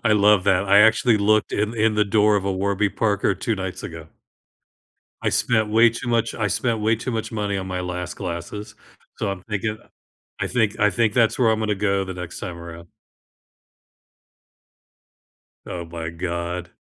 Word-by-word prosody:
I 110 - +4
love 105 -2 +4
that. 95 -1 +3
I 100 +1 +7
actually 110 0 +4
looked 110 +1 +2
in 105 +3 -1
in 110 -1 +2
the 105 0 +3
door 105 +1 +3
of 100 - -1
a 100 - 0
Warby 100 +1 0
Parker 100 -3 +1
2 110 +4 -2
nights 95 -1 -5
ago. 80 -1 -8 1.2
I - - +2
spent 110 -3 +1
way 115 +2 +6
too 120 +2 -7
much 115 -1 +1
I 105 - -1
spent 115 +3 0
way 110 +1 +2
to 120 +3 -4
much 115 +1 -3
money 105 -2 -2
on 95 0 -4
my 90 0 -3
last 90 0 -4
glasses, 90 +3 -6 0.4
so - - -2
I'm 95 -1 -5
thinking 110 0 -3 0.6
I - - -1
think 110 -4 0
I 105 - +4
think 105 +2 +1
that's 115 -3 +3
where 120 -3 +3
I'm 110 - 0
gonna 105 -1 0
go 100 0 0
the 95 -1 -6
next 90 -2 -7
time 90 -4 -6
around. 85 0 -10 2.8
Oh 85 -2 -5
my 80 -1 -6
god. 85 +1 -4
100 Hz, 180 wpm, -22 LUFS, 90-110 Hz, 2.8 s, I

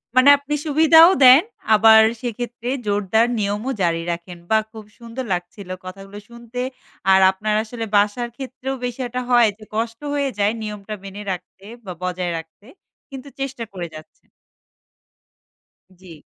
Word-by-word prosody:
মানে 255 +2 +6
আপনি 285 +1 -6
সুবিধাও 320 +3 +6
দেন। 255 +4 +9 0.3
আবার 220 +1 +7 0.2
সেক্ষেত্রে 240 0 -5 0.2
জোরদার 205 +3 +1
নিয়মও 210 +6 -2
জারি 165 -1 +1
রাখেন। 170 +1 -7
বাহ! 220 0 +3
খুব 220 -2 -11
সুন্দর 235 +2 -7
লাগছিলো 180 +1 -6
কথাগুলো 195 +2 -9
শুনতে। 235 +1 -9 0.5
আর 190 - +6
আপনার 210 +2 -2
আসলে 225 0 -6
বাসার 210 +4 +1
ক্ষেত্রেও 265 0 -5
বিশয় 245 0 -4
টা 250 - 0
হয় 240 -3 +5
যে, 215 - -15
কষ্ট 230 +1 -2
হয়ে 280 -1 0
যায় 205 +1 +3
নিয়মটা 210 -1 -6
মেনে 195 +1 -8
রাখতে 185 +1 -8 0.2
বা 180 - -6
বজায় 180 -1 -2
রাখতে। 165 +5 -12 0.4
কিন্তু 270 0 -9
চেষ্টা 270 -3 -4
করে 175 -2 -5
যাচ্ছেন। 155 - -15 1.7
জ্বী। 175 -4 -13
220 Hz, 145 wpm, -21 LUFS, 195-250 Hz, 1.7 s, দেন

